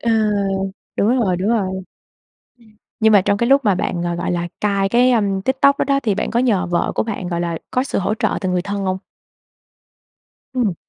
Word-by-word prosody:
Ờ, 235 Hz, -, 0 dB, 0.9 s
đúng 205 Hz, -, +2 dB
rồi, 185 Hz, -5 st, +1 dB
đúng 190 Hz, +4 st, -1 dB
rồi. 230 Hz, -2 st, +2 dB
Ừm, 190 Hz, -, -5 dB, 1.2 s
nhưng 220 Hz, 0 st, +4 dB
mà 200 Hz, -, +7 dB
trong 200 Hz, +1 st, +1 dB
cái 235 Hz, +3 st, 0 dB
lúc 275 Hz, -2 st, +4 dB
mà 205 Hz, -3 st, +3 dB
bạn, 175 Hz, -1 st, -2 dB
ờ, 175 Hz, 0 st, -1 dB
gọi 175 Hz, -, -2 dB
là, 175 Hz, 0 st, -2 dB
cai 200 Hz, -2 st, +1 dB
cái, 250 Hz, +3 st, +4 dB
ưm, 200 Hz, -4 st, +1 dB
TikTok 270 Hz, +4 st, +3 dB
đó -, -, +1 dB
đó 275 Hz, 0 st, +2 dB
thì 210 Hz, -4 st, +1 dB
bạn -, -, -2 dB
có 235 Hz, -, +1 dB
nhờ 215 Hz, -7 st, +2 dB
vợ 175 Hz, 0 st, 0 dB
của -, -, +1 dB
bạn, 205 Hz, -5 st, -4 dB
gọi 170 Hz, -1 st, -2 dB
là, 170 Hz, -1 st, -2 dB
có 255 Hz, -, +1 dB
sự 270 Hz, -, -2 dB
hỗ 195 Hz, -, 0 dB
trợ -, -, 0 dB
từ 185 Hz, -, -1 dB
người 180 Hz, -1 st, 0 dB
thân 200 Hz, +1 st, -4 dB
hông? 185 Hz, 0 st, -1 dB, 1.6 s
Ừm. 230 Hz, -8 st, +1 dB
200 Hz, 220 wpm, -19 LUFS, 185-235 Hz, 1.6 s, mà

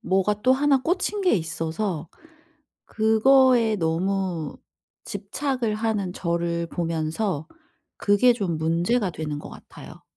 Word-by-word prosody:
뭐가 195 Hz, +3 st, 0 dB
또 255 Hz, -, +5 dB
1 275 Hz, 0 st, +3 dB
꽂힌 375 Hz, +5 st, -1 dB
게 375 Hz, -2 st, +3 dB
있어서 165 Hz, +1 st, -3 dB, 0.8 s
그거에 230 Hz, +1 st, +4 dB
너무 175 Hz, -1 st, -1 dB, 0.5 s
집착을 225 Hz, +3 st, -2 dB
하는 215 Hz, -4 st, -1 dB
저를 170 Hz, -1 st, -2 dB
보면서 165 Hz, 0 st, -2 dB, 0.5 s
그게 205 Hz, +5 st, +4 dB
좀 195 Hz, -8 st, -2 dB
문제가 170 Hz, +7 st, +1 dB
되는 155 Hz, -2 st, -4 dB
것 -, -, -9 dB
같아요. -, -, -13 dB
195 Hz, 215 characters per minute, -24 LUFS, 165-230 Hz, 0.8 s, 또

